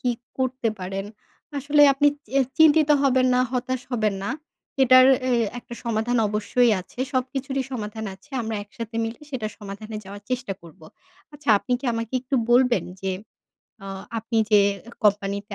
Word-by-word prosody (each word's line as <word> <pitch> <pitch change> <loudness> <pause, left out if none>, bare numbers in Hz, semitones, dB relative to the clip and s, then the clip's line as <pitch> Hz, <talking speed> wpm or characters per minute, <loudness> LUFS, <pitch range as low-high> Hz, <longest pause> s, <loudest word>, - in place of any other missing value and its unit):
কি 250 - +1 0.3
করতে 255 -2 0
পারেন। 195 +2 -4 0.5
আসলে 290 +2 +4
আপনি 290 +2 +4 0.2
চে 270 +5 +1 0.2
চিন্তিত 315 -1 +6
হবেন 260 -2 +3
না, 250 - +3
হতাশ 255 0 -1
হবেন 215 -4 +1
না। 200 - -2 0.5
এটার 255 0 +8 0.2
এ - - +1 0.3
একটা 240 - -10
সমাধান 230 +1 0
অবশ্যই 215 +3 +2
আছে 185 - -17
সবকিছুরই 265 +1 -2
সমাধান 220 -2 -5
আছে। 195 +10 -22
আমরা 220 -1 -3
একসাথে 225 +2 -8
মিলে 225 +1 -6
সেটা 250 -6 -3
সমাধানে 215 +1 -7
যাওয়ার 200 +1 -10
চেষ্টা 250 -5 -2
করবো। 160 -1 -15 0.5
আচ্ছা 295 -2 -11
আপনি 250 - -4
কি - - -11
আমাকে 230 0 -4
একটু 260 +2 -4 0.2
বলবেন 245 0 +4 0.2
যে 190 - -2 0.7
আ - - -7 0.3
আপনি 225 +1 -4
যে 210 - +7 0.3
এ - - -9
কোম্পানিতে 200 0 +1
235 Hz, 160 wpm, -24 LUFS, 210-260 Hz, 0.7 s, এটার